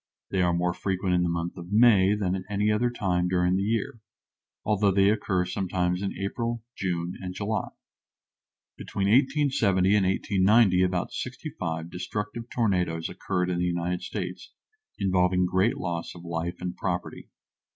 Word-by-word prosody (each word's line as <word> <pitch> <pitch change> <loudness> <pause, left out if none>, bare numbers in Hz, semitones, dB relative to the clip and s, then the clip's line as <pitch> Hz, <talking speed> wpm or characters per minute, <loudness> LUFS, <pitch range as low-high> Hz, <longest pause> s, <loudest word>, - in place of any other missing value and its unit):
They 95 - +1
are 90 -1 +3
more 90 +1 0
frequent 95 0 -1
in 90 - +3
the 90 - +1
month 85 +1 -3
of 90 +1 -9
May 105 -3 +5
than 95 -3 -1
at 95 - -2
any 105 +1 +1
other 115 +3 +2
time 90 -7 0
during 90 0 +2
the 95 - +1
year, 110 +2 -1 0.7
although 105 -1 +2
they 100 +1 +4
occur 95 -4 0
sometimes 90 -1 -1
in 100 - -3
April, 115 +3 -3
June, 90 -2 -2
and 90 -1 -6
July. 105 +1 -2 1.1
Between 100 - -3
1870 130 -7 +3
and 100 -3 +3
1890 95 0 +3
about 90 -1 0
sixty 130 +5 -5
five 80 -6 -4
destructive 105 +5 -5
tornadoes 90 -8 0
occurred 90 -1 -2
in 85 - -1
the 90 - +1
United 90 0 -1
States, 90 -3 -6 0.5
involving 90 -1 +2
great 95 +5 +1
loss 85 -1 -4
of 85 - -11
life 85 +1 -3
and 90 0 -4
property. 90 -2 -4
95 Hz, 160 wpm, -27 LUFS, 90-105 Hz, 1.1 s, May